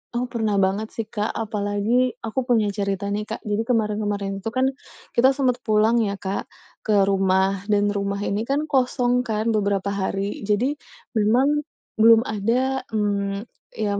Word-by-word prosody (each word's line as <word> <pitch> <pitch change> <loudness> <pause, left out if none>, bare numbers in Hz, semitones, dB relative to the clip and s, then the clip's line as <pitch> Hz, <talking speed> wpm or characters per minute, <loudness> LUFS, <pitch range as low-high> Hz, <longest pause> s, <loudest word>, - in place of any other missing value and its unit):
Oh, 240 - 0
pernah 220 -4 0
banget 195 +2 +1
sih, 225 - -2
Kak. 210 0 -3
Apalagi 215 +3 0
aku 225 +3 -2
punya 220 -5 +2
cerita 200 0 -2
nih, 210 +1 -2
Kak. - - -6
Jadi 210 +1 -1
kemarin-kemarin 210 -4 -1
itu 215 +3 -4
kan 260 +1 +2 0.4
kita 260 +3 +4
sempet 255 -3 +1
pulang 215 +2 +3
ya, 200 -3 0
Kak, 195 0 -4 0.3
ke 205 -2 +2
rumah. 195 0 +2
Dan 205 -1 +2
rumah 200 0 -2
ini 210 +3 -2
kan 280 +2 +1
kosong 250 -2 +2
kan 220 +1 0
beberapa 200 -2 0
hari. 200 +1 -3
Jadi 250 +8 +1 0.3
memang 250 +7 +3 0.4
belum 225 +1 +7
ada, 250 +5 -1
mmm, 200 -2 -1 0.3
iya, 205 -2 -1
210 Hz, 155 wpm, -23 LUFS, 200-235 Hz, 0.4 s, belum